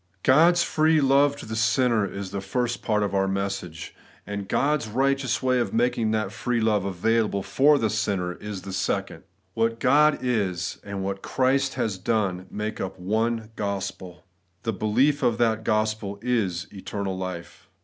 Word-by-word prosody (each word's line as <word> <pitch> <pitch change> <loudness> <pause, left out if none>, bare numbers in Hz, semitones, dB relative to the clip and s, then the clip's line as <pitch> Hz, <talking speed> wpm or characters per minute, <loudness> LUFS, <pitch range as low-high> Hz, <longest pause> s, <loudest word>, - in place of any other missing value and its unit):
God's 170 +6 +5
free 155 0 +3
love 140 +1 +4
to 145 - -9
the 110 - -5
sinner 115 -1 +2
is 100 -1 -6
the 100 - -3
first 120 +5 -2
part 105 -2 +1
of 100 -1 -2
our 95 0 +2
message; 95 -5 -4 0.3
and 100 -1 -5
God's 145 -4 +1
righteous 135 +3 0
my 130 -1 +3
of 120 - -1
making 120 -1 +1
that 110 -2 -1
free 120 +1 -1
love 105 -3 +1
available 100 +1 0
for 145 +7 +4
the 115 - +1
sinner 90 -4 -1
is 105 0 -7
the 95 - -7
second. 95 - -2 0.3
What 115 0 0
God 150 +3 +4
is, 100 -8 -1
and 100 -1 -5
what 95 0 -3
Christ 135 +1 +1
has 100 -4 -2
done, 95 -3 -1
make 105 +1 -4
up 95 0 -4
one 110 +4 -1
gospel. 95 -3 -5 0.4
The 115 -1 -1
belief 125 +9 +2
of 120 -3 +2
that 110 -2 +1
gospel 110 -2 -1
is 100 -8 0
eternal 95 0 -4
life. 90 -2 -7
110 Hz, 165 wpm, -25 LUFS, 95-125 Hz, 0.4 s, God's